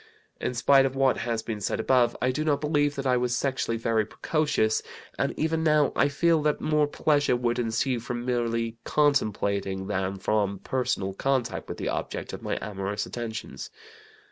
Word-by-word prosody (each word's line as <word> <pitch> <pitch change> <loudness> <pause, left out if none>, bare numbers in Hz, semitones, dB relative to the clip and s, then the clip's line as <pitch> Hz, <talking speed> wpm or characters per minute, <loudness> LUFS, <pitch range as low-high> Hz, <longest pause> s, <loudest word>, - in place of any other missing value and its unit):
"In 125 - -2
spite 135 +3 +5
of 135 - -6
what 135 -1 +3
has 115 -1 -2
been 110 -3 -4
said 95 - -1
above, 125 -2 +3
I 125 - +1
do 150 +4 -2
not 150 -2 +1
believe 145 -1 +1
that 135 - -4
I 125 -1 +3
was 125 0 0
sexually 130 -4 -1
very 115 -1 +1
precocious, 110 -2 0 0.4
and - - +1
even 160 +1 0
now 150 -2 +3
I 140 - +4
feel 165 +2 +2
that 150 0 +1
more 150 -1 +2
pleasure 145 -2 +2
would 120 0 0
ensue 120 +2 0
from 120 +1 -5
merely 115 -2 -1
contemplating 100 -9 +1
than 95 -1 -2
from 100 0 0
personal 95 -4 -2
contact 130 +1 -1
with - - -5
the - - -2
object - - -4
of - - -6
my - - -2
amorous 100 0 -3
attentions. 110 - -6
120 Hz, 175 wpm, -27 LUFS, 110-140 Hz, 0.4 s, spite